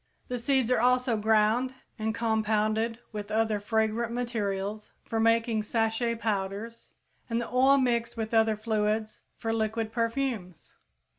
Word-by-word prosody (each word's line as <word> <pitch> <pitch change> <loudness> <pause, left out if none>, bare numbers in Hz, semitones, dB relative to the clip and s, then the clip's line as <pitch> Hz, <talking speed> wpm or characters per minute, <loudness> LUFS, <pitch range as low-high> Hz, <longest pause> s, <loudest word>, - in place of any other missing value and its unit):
The 250 -1 -2
seeds 255 0 +1
are 250 - +3
also 250 0 +3
ground 220 +4 +2 0.2
and 220 +1 -1
compounded 220 0 +1
with 210 -1 -6
other 220 -1 +1
fragrant 220 +2 0
materials 215 -4 -3 0.2
for 225 - -2
making 230 0 +2
sachet 225 +2 0
powders, 215 +1 -4 0.3
and 230 0 0
the 235 - -3
oil 265 +3 +4
mixed 235 -3 0
with 220 0 -3
other 220 -1 +4
fluids 215 0 -1 0.2
for 225 0 -2
liquid 220 0 -1
perfumes. 230 -6 -2
225 Hz, 135 wpm, -28 LUFS, 215-235 Hz, 0.3 s, oil